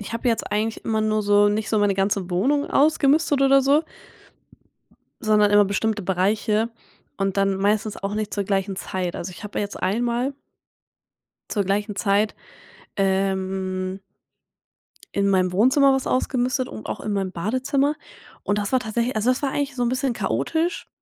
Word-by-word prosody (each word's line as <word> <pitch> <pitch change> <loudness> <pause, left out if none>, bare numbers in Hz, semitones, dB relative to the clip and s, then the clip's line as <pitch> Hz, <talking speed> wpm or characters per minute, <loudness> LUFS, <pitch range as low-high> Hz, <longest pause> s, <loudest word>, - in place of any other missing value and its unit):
ich 210 - -7
habe 230 +2 -1
jetzt 230 -2 -1
eigentlich 220 +2 -2
immer 220 -1 0
nur 215 0 +1
so 205 0 +4
nicht 210 0 -1
so 215 - +1
meine 205 -1 +2
ganze 195 -1 -1
Wohnung 270 +12 +1
ausgemistet 290 0 +3
oder 275 0 +5
so 285 +4 +3 1.4
sondern 210 -1 +3
immer 205 0 +6
bestimmte 210 +2 -1
Bereiche 210 +4 0 0.5
und 195 0 -1
dann 195 0 +2
meistens 205 +2 0
auch 195 +1 -3
nicht 215 -1 -3
zur 200 - -1
gleichen 195 0 -1
Zeit. 185 -1 -4
Also, 185 - -5
ich 180 - -12
habe 205 - -4
ja - - 0
jetzt 205 - -7
einmal 240 +7 0 1.2
zur 205 - 0
gleichen 205 +2 -1
Zeit, 205 +1 +1 0.6
ähm 190 -1 -1 1.1
in 200 0 +2
meinem 185 -2 +2
Wohnzimmer 260 +7 +4
was 265 -1 -1
ausgemistet 255 0 0
und 220 - -9
auch - - -4
in 210 - -3
meinem 195 -2 -1
Badezimmer. 260 - 0 0.5
Und 205 - 0
das 205 -1 -2
war 260 - +4
tatsächlich 235 +2 -2
also, 215 +3 +1
das 255 - +1
war 275 - 0
eigentlich 280 -1 -2
so 245 - -1
'n 240 - +1
bisschen 255 0 -1
chaotisch, 330 +8 -1
210 Hz, 170 wpm, -23 LUFS, 195-250 Hz, 1.4 s, immer